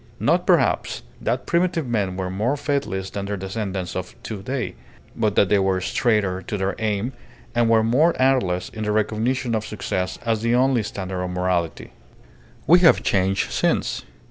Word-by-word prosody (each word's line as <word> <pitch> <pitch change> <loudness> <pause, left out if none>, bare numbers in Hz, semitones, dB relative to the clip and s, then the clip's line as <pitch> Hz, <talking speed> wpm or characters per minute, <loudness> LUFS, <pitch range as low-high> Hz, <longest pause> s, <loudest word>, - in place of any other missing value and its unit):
Not - - +2
perhaps - - +2 0.2
that 120 +3 -1
primitive 170 -2 +1
men 100 -6 -1
were 95 -1 -3
more 110 +9 0
faithless 115 -10 -2
than 100 -1 -4
their 100 0 -2
descendants 95 -1 -4
of 90 -1 -5
to 105 -4 -5
day, 130 +5 -3 0.4
but 105 -3 0
that 100 - +4
they 105 - +4
went 95 -1 +1
straighter 100 -4 +1
to 105 - -4
their 95 0 -1
aim, 110 +3 -1 0.4
and 120 -1 +2
were 110 -1 +4
more 145 +9 +3
artless 125 -10 +2
in 110 - -8
their 105 0 0
recognition 115 +4 0
of 110 -1 0
success 95 -4 -3
as 115 -2 +1
the 115 +1 +2
only 130 -1 +3
standard 95 -3 -4
of 90 - -3
morality. 90 -2 -1 0.7
We 175 +5 +7
have 175 -2 +5
changed 95 0 +1
since. - - 0
105 Hz, 170 wpm, -23 LUFS, 95-120 Hz, 0.7 s, We